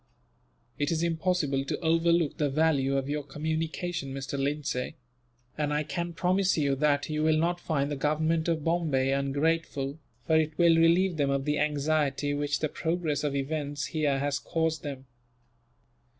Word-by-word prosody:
"It 145 - +1
is 165 0 0
impossible 165 -5 0
to - - -3
overlook 165 -1 +2
the 150 -2 +2
value 140 -2 +2
of 135 0 -2
your 150 +1 -1
communication, 155 0 -3
Mr. 135 +1 -4
Lindsay; 140 -2 -2 0.6
and 150 -1 0
I 150 +1 +1
can 170 +2 -4
promise 185 +2 +1
you 140 -3 +2
that 145 0 +2
you 155 0 -1
will 155 0 +3
not 175 +2 +1
find 145 -4 -1
the - - -1
Government 155 +3 0
of 165 -3 0
Bombay 155 -6 +1
ungrateful, 140 +1 -1 0.3
for 160 - +3
it 155 -1 0
will 170 -1 +5
relieve 170 +2 +4
them 140 -2 +1
of 140 0 0
the 150 0 0
anxiety 145 -1 0
which 145 0 -1
the 155 - +2
progress 160 -2 -2
of 145 -2 -1
events 145 +1 -2
here 150 -3 +1
has 140 0 -1
caused 160 -2 -1
them." 135 -3 -6
150 Hz, 165 wpm, -28 LUFS, 140-165 Hz, 0.6 s, will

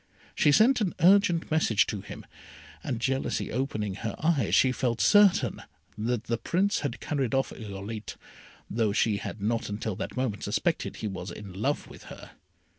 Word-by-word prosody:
She 145 - +3
sent 230 - +5
an 190 -5 -1
urgent 180 -2 +4
message 135 -9 +3
to 105 - -4
him, - - -10 0.6
and 120 - -3
jealousy 135 +2 -1
opening 110 -6 -2
her 115 - -4
eyes, 155 -9 +1
she 130 - +5
felt 120 -2 -1
certain 205 -3 +4 0.3
that 115 +1 -2
the 115 -1 -2
Prince 195 - +1
had 140 -4 -4
carried 135 -5 -1
off 135 - 0
Irolite, 105 0 -7 0.5
although 110 -2 0
she 105 0 +2
had 100 +1 -6
not 115 +1 -1
until 105 0 -3
that - - -5
moment 125 -6 -2
suspected - - -1
he 110 - -4
was 95 -2 -6
in 95 +2 -9
love 130 +10 -2
with - - -13
her. - - -11
120 Hz, 170 wpm, -28 LUFS, 105-150 Hz, 0.6 s, sent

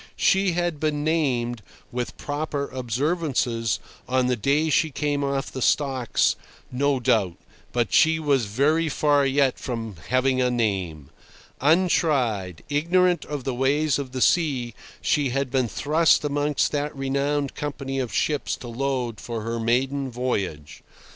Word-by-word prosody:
She 190 -2 +3
had 175 -3 -1
been 150 -1 -1
named, 125 -8 0 0.3
with 125 0 -4
proper 145 -1 -3
observances, 125 -4 -1 0.3
on 130 0 +2
the 125 0 +1
day 145 +7 +1
she 160 - +3
came 145 0 -1
off 140 -1 -2
the 130 - -6
stocks, 130 -3 +2 0.4
no 140 +1 +1
doubt, 100 -7 +1 0.3
but 120 -3 -1
she 160 0 +5
was 140 -6 +1
very 150 +10 +1
far 145 -1 +2
yet 135 -1 +2
from 115 -6 -5
"having 130 +1 +2
a 125 - +2
name." 95 - -2 0.5
Untried, 135 - +1
ignorant 175 +4 +2
of 145 -3 -5
the 130 - -2
ways 140 +4 +1
of 135 -3 -5
the 130 -1 -4
sea, 130 -3 +2 0.3
she 145 -3 +1
had 135 0 -2
been 130 -3 +1
thrust 150 - +2
amongst 145 0 0
that 145 0 -2
renowned 140 +1 -1
company 140 -2 -4
of 125 -4 -2
ships 140 +8 0
to 125 - -10
load 125 -2 -2
for 115 -2 -5
her 115 +1 -3
maiden 130 +4 0
voyage. 100 - -3
135 Hz, 145 wpm, -24 LUFS, 120-150 Hz, 0.5 s, she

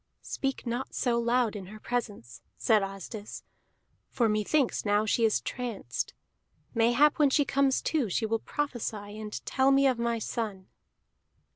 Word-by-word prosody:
"Speak 270 -1 -3
not 240 +2 -3
so 235 -2 +1
loud 235 -1 +1
in 195 -3 -6
her 215 +2 -10
presence," 215 - -4 0.2
said 220 -3 +3
Asdis, 195 +2 -6 0.7
"for 235 - +1
methinks 220 +6 +1
now 205 0 +2
she 225 +2 +2
is 215 - +2
tranced. 240 - -4 0.6
Mayhap 240 +7 +4
when 295 -2 +5
she 290 +1 +3
comes 275 -1 +2
to 285 -9 0
she 220 +5 0
will 225 +1 0
prophesy 215 -8 -4
and 210 -1 -6
tell 265 0 +3
me 275 0 +5
of 255 -3 +3
my 235 0 0
son." 215 -4 -4
235 Hz, 150 wpm, -29 LUFS, 210-260 Hz, 0.7 s, when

